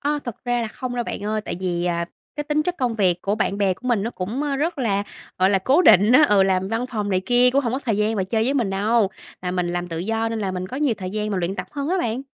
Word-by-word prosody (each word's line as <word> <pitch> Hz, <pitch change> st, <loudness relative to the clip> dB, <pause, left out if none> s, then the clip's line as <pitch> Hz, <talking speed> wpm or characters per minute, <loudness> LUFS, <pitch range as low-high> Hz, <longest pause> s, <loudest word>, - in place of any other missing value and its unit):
A, 295 Hz, +1 st, 0 dB
thực 240 Hz, 0 st, -7 dB
ra 245 Hz, -1 st, 0 dB
là 220 Hz, -, -3 dB
không 250 Hz, +2 st, -5 dB
đâu 240 Hz, -1 st, -1 dB
bạn -, -, -5 dB
ơi, 215 Hz, +1 st, -1 dB
tại 190 Hz, -, -5 dB
vì, 175 Hz, -2 st, -1 dB
à, 170 Hz, -1 st, 0 dB, 0.3 s
cái 295 Hz, -, -3 dB
tính 300 Hz, +1 st, +1 dB
chất 360 Hz, +2 st, -2 dB
công 245 Hz, -3 st, 0 dB
việc 185 Hz, -5 st, +1 dB
của 200 Hz, +1 st, 0 dB
bạn 200 Hz, -2 st, -1 dB
bè 195 Hz, -2 st, +2 dB
của 255 Hz, -, -7 dB
mình 230 Hz, -5 st, +2 dB
nó 230 Hz, -, -2 dB
cũng, 220 Hz, +8 st, -4 dB
a, 285 Hz, -2 st, -1 dB
rất 325 Hz, +2 st, -1 dB
là, 200 Hz, -5 st, +1 dB, 0.4 s
gọi 185 Hz, +1 st, +4 dB
là, 195 Hz, -, +3 dB
cố 270 Hz, -, +3 dB
định 205 Hz, -, +6 dB
á. 285 Hz, -, +7 dB
Ừ, 200 Hz, -2 st, +5 dB
làm 190 Hz, 0 st, +1 dB
văn 225 Hz, +3 st, -1 dB
phòng 215 Hz, -5 st, -3 dB
này 185 Hz, -1 st, +2 dB
kia 245 Hz, 0 st, +5 dB
cũng 275 Hz, +2 st, +3 dB
hổng 235 Hz, -, -1 dB
có 260 Hz, -, 0 dB
thời 230 Hz, -7 st, -1 dB
gian 215 Hz, +1 st, +1 dB
mà 190 Hz, -, 0 dB
chơi 220 Hz, +3 st, 0 dB
với 270 Hz, +4 st, 0 dB
mình 230 Hz, -8 st, +1 dB
đâu, 205 Hz, +1 st, +2 dB, 0.3 s
là 180 Hz, -, -2 dB
mình 180 Hz, -1 st, -1 dB
làm 175 Hz, 0 st, -3 dB
tự 165 Hz, -1 st, -4 dB
do 225 Hz, +5 st, -1 dB
nên 225 Hz, -, -3 dB
là 200 Hz, -3 st, -2 dB
mình 185 Hz, 0 st, -4 dB
có 260 Hz, -, -6 dB
nhiều 285 Hz, -5 st, +1 dB
thời 185 Hz, -1 st, -5 dB
gian 210 Hz, +1 st, -2 dB
mà 195 Hz, -, -1 dB
luyện 180 Hz, +2 st, -1 dB
tập -, -, -4 dB
hơn 285 Hz, 0 st, -3 dB
á 370 Hz, +2 st, +1 dB
bạn. 240 Hz, -2 st, -2 dB
220 Hz, 315 wpm, -22 LUFS, 190-250 Hz, 0.4 s, á